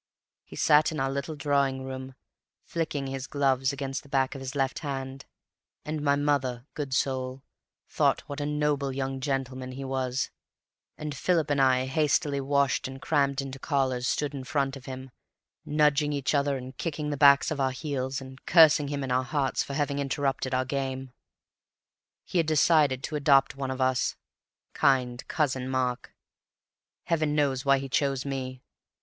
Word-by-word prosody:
He - - -12
sat 150 +2 +4
in 155 - -4
our 135 0 0
little 140 +3 -3
drawing 140 -2 +1
room, 130 0 -7 0.5
flicking 160 -4 -3
his 135 0 -4
gloves 135 -2 +1
against 135 -1 -4
the 140 - -18
back 135 -1 +1
of 135 - -8
his 135 +1 -6
left 135 -2 0
hand, 135 -1 -5 0.6
and 155 0 -3
my 140 -1 +3
mother, 135 -4 0
good 145 -3 -4
soul, 130 0 -1 0.4
thought - - +2
what 145 0 -6
a 145 - -1
noble 150 -2 0
young 135 0 -3
gentleman 130 -1 -3
he 135 +1 -6
was, 130 0 -2 0.7
and 150 -1 -5
Philip 160 -2 +1
and 140 -1 +2
I, 130 -1 +4
hastily 145 +1 +1
washed 140 -1 +1
and 135 0 -8
crammed 140 -2 +1
into 135 0 -7
collars, 130 -4 0
stood 145 +2 -1
in 135 -2 -5
front 135 0 -1
of 135 -2 -11
him, 130 0 -7 0.5
nudging 150 0 +2
each 140 0 -1
other 140 -1 +1
and 130 0 -9
kicking 150 0 -3
the - - -1
backs 140 +1 +6
of 150 - -2
our 135 -1 +2
heels 130 -1 -3
and 130 0 -12
cursing 155 -3 +6
him 140 -1 -3
in 130 - -3
our 130 +1 +2
hearts 135 -1 0
for 140 - -4
having 145 -1 0
interrupted 135 -1 -1
our 130 0 +1
game. 130 -1 -3 1.1
He 180 - -1
had 165 - +1
decided 150 -4 +3
to 155 - -4
adopt 140 -2 +4
one 135 -1 -4
of 130 0 -4
us, 130 -1 +1 0.6
kind 125 -3 +2
Cousin 130 -4 -1
Mark. 125 -1 -2 0.9
Heaven 155 -3 0
knows 140 -2 +1
why 140 0 +5
he 135 0 -4
chose 135 0 0
me. 130 -2 -4
135 Hz, 170 wpm, -28 LUFS, 130-145 Hz, 1.1 s, backs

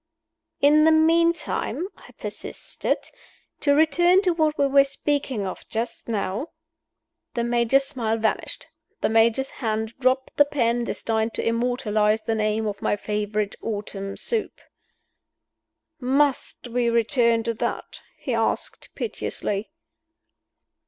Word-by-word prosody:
"In 300 +2 +6
the 320 - +6
meantime," 335 +2 +2
I - - -16
persisted, - - -3 0.6
"to 285 -1 +3
return 345 +5 +4
to 365 - +3
what 310 -2 +1
we 280 - +3
were 275 0 +6
speaking 275 -5 -2
of 185 - -6
just 230 +1 -4
now 210 - -2 0.4
" - - -59
The 235 - 0
Major's 240 +3 +2
smile 235 -6 -1
vanished; 220 0 -2 0.4
the - - +2
Major's 225 +4 +3
hand 220 -1 -1
dropped 260 0 +1
the 290 - +7
pen 240 -4 0
destined 225 0 -1
to - - -1
immortalize 225 -3 +1
the 225 - -1
name 215 0 0
of 205 -2 -4
my - - +1
favorite 210 0 -2
autumn 200 -2 -4
soup. 455 -2 -2 1.4
"Must 270 0 +1
we 240 0 +1
return 235 0 +3
to 230 0 -1
that?" 220 - -4 0.2
he - - -3
asked, - - -1
piteously. 210 - -3
235 Hz, 125 wpm, -24 LUFS, 220-285 Hz, 1.4 s, the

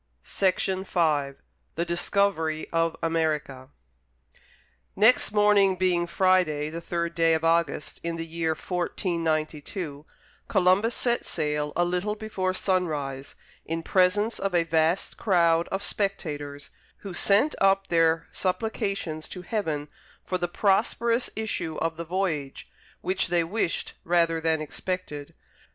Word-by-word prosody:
Charles 190 -2 +1
Mackay 165 -7 0 0.4
THE 170 - -1
DISCOVERY 170 -2 0
OF 165 0 +1
AMERICA 150 -5 -1 1.3
Next 220 +4 +4
morning, 205 -2 +4
being 180 -2 +1
Friday 170 -5 +2
the 165 +1 -5
third 170 0 -2
day 165 -1 +3
of 160 - -2
August, 165 -3 0
in 170 0 -3
the 165 0 -4
year 165 0 -1
1492, 160 -3 -3 0.4
Columbus 195 +4 +3
set 240 -1 +1
sail, 150 -2 -2
a 175 - +2
little 180 +4 -1
before 210 -4 -2
sunrise, 150 -9 -2 0.3
in 165 +1 -4
presence 205 +6 +2
of 195 -2 -1
a 170 - +4
vast 165 +2 +1
crowd 170 -5 +3
of 195 +1 -3
spectators, 145 -10 -3 0.3
who 195 -3 -7
sent 205 - +4
up 195 0 +4
their 165 -2 +2
supplications 195 -5 -2
to 180 - -7
Heaven 160 -8 -2 0.4
for 185 - -2
the 175 - 0
prosperous 230 +6 +1
issue 175 -7 -3
of 165 -1 -2
the 170 - -5
voyage, 165 -6 -2 0.3
which 185 +1 0
they 175 -1 +2
wished 175 +1 -1
rather 165 -1 +2
than 160 -1 +1
expected. 155 -2 -5
170 Hz, 125 wpm, -26 LUFS, 160-195 Hz, 1.3 s, Next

